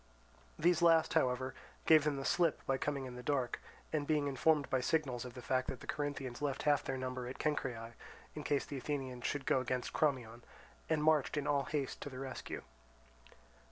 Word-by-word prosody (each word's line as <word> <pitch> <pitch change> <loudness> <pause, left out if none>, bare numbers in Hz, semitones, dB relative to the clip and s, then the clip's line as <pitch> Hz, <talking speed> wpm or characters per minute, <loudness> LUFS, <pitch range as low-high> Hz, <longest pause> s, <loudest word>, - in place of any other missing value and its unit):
These 175 0 +3
last, 165 -1 +5
however, 130 +1 +1 0.3
gave 155 -2 +7
them 150 -2 +1
the 135 - -4
slip 170 -3 +2
by 135 -1 +1
coming 140 -2 -1
in 125 - -7
the 125 - -7
dark; 130 -2 -1 0.3
and 145 -2 0
being 150 -2 +2
informed 145 +2 +3
by 130 - +1
signals 130 -5 0
of 125 0 -8
the 125 - -8
fact 130 +1 +1
the - - -10
Corinthians 145 -4 -3
left 140 -2 -1
half 145 -1 +3
their 135 - -2
number 130 -1 -3
at 125 - -6
Cenchreae, 120 -6 -2 0.4
in 150 - -6
case 145 -1 +1
the 140 - -5
Athenians 130 -3 -3
should 145 -2 -2
go - - +3
against 125 0 -2
Crommyon, 125 -6 0 0.5
and 155 -2 +2
marched 155 -2 +3
in 145 - 0
all 140 -2 +2
haste 145 -3 -2
to - - -4
the 130 - -9
rescue. 130 -1 -5
135 Hz, 190 wpm, -35 LUFS, 130-150 Hz, 0.5 s, gave